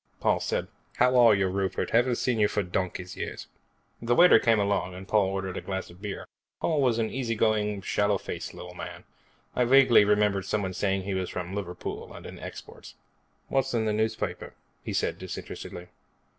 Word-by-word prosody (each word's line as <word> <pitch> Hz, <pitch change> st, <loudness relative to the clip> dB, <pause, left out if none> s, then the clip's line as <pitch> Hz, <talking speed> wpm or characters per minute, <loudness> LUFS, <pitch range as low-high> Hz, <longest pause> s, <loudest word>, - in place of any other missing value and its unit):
Paul -, -, +2 dB
said, -, -, -2 dB, 0.3 s
"How 125 Hz, +1 st, +3 dB
are 120 Hz, -4 st, +7 dB
you, 95 Hz, -1 st, +1 dB
Rupert? 95 Hz, 0 st, -2 dB
Haven't 120 Hz, +1 st, +3 dB
seen 120 Hz, -1 st, 0 dB
you 105 Hz, -, +5 dB
for 105 Hz, -, -1 dB
donkey's 90 Hz, 0 st, -3 dB
years." -, -, -5 dB, 0.6 s
The 120 Hz, +1 st, +1 dB
waiter 180 Hz, +5 st, +8 dB
came 115 Hz, -3 st, +3 dB
along 100 Hz, -3 st, 0 dB
and 95 Hz, +1 st, -9 dB
Paul 105 Hz, -2 st, +3 dB
ordered 95 Hz, -1 st, -3 dB
a -, -, -3 dB
glass 95 Hz, -2 st, -4 dB
of 90 Hz, +2 st, -17 dB
beer. 100 Hz, -2 st, -5 dB, 0.3 s
Paul 155 Hz, -3 st, +1 dB
was 125 Hz, -4 st, +2 dB
an 110 Hz, -1 st, 0 dB
easy 120 Hz, -3 st, -2 dB
going, 105 Hz, -2 st, +1 dB
sallow 100 Hz, +1 st, +1 dB
faced -, -, -6 dB
little 90 Hz, 0 st, -9 dB
man. -, -, -8 dB, 0.5 s
I 125 Hz, -, +3 dB
vaguely 130 Hz, -3 st, +6 dB
remembered 105 Hz, -2 st, +2 dB
somebody 95 Hz, -2 st, -1 dB
saying 95 Hz, 0 st, 0 dB
he 100 Hz, +1 st, -3 dB
was 95 Hz, -1 st, -2 dB
from 90 Hz, +1 st, -5 dB
Liverpool 90 Hz, -3 st, -5 dB
and -, -, -10 dB
in -, -, -9 dB
exports. -, -, -10 dB, 0.5 s
"What's 135 Hz, -2 st, 0 dB
in 110 Hz, -1 st, +1 dB
the 105 Hz, -, +1 dB
newspaper?" 110 Hz, +1 st, -2 dB, 0.3 s
he -, -, -4 dB
said, -, -, -1 dB
disinterestedly. 90 Hz, 0 st, -7 dB
105 Hz, 185 wpm, -27 LUFS, 95-115 Hz, 0.6 s, waiter